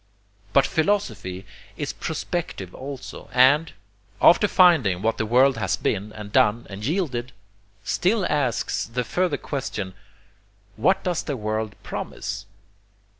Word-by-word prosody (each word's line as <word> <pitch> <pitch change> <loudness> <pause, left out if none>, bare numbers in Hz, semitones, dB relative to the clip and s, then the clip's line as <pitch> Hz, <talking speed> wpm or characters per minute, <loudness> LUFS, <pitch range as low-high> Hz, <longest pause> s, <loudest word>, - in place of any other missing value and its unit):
But 135 - +5
philosophy 120 - -1 0.3
is - - -3
prospective 90 -2 -4
also, 135 0 -8
and, 145 +6 +5 0.5
after 210 +5 +6
finding 155 - +4
what 115 +1 0
the 110 - 0
world 130 +3 +4
has 95 -3 0
been 105 +1 -2
and 105 -1 -8
done 105 +3 +3
and 100 +2 -7
yielded, 130 - -2 0.5
still 200 +2 +1
asks 135 -6 0
the 125 +2 -2
further 180 +9 0
question 110 -9 -4 0.8
'what 190 - +2
does 180 -3 0
the 140 -4 -4
world 110 -1 -3
PROMISE?' 105 - -5
125 Hz, 125 wpm, -24 LUFS, 105-160 Hz, 0.8 s, after